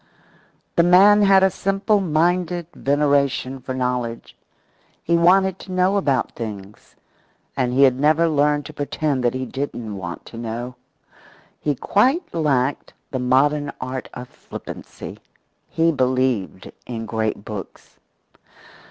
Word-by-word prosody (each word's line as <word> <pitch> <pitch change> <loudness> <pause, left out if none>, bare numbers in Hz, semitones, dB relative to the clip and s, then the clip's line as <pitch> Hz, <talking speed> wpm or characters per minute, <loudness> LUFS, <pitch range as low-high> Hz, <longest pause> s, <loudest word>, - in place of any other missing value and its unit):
The - - +7
man 195 +4 +6
had 195 -1 +5
a 190 - +4
simple 195 +3 +1
minded 175 0 0
veneration 140 -2 +1
for 130 +1 -6
knowledge. 125 -2 -3 0.7
He 170 - +1
wanted 185 +2 +4
to 190 - -10
know 185 +2 +2
about 140 -10 +1
things. 105 -3 -9 0.6
And 125 -2 0
he 135 +2 +4
had 130 -1 +4
never 155 +3 +3
learned 145 -1 +1
to - - -9
pretend 145 -2 -2
that 120 +1 +1
he 130 0 -3
didn't 120 -5 -5
want 85 -3 -7
to 115 - -11
know. 120 +2 -5 0.9
He 145 -2 -1
quite 265 - +1
lacked 145 -5 0 0.2
the 130 - -2
modern 140 +3 +2
art 130 0 -5
of 125 0 -7
flippancy. - - -10 0.5
He 165 +1 +2
believed 130 - -1 0.2
in 115 -2 -5
great 110 -2 -2
books. 105 -3 -9
140 Hz, 130 wpm, -21 LUFS, 125-170 Hz, 0.9 s, The